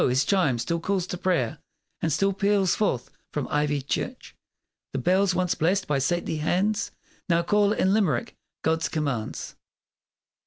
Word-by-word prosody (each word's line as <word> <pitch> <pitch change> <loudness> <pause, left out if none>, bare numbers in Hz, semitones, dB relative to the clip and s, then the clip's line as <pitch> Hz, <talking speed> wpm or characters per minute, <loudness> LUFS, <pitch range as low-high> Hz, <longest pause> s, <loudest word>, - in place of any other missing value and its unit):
his 130 +2 +2
chime 165 -10 +2
still 170 +8 -1
calls 190 +1 0
to 180 - -4
prayer, 175 -10 0 0.4
And 165 - 0
still 195 +6 +2
peals 200 -1 +2
forth 135 - -1 0.2
from 150 -3 -2
ivied 150 -2 0
church. - - -4 0.6
The - - -1
bells 185 +7 +2
once 180 -1 +1
blessed 185 +5 +1
by 145 -2 +1
saintly 165 +3 0
hands 190 +7 +1 0.4
Now 170 0 +3
call, 205 +3 +3
in 190 -2 +2
Limerick, 220 +2 +1 0.3
God's 160 0 +1
commands! 140 -8 -3
175 Hz, 150 wpm, -26 LUFS, 150-195 Hz, 0.6 s, Now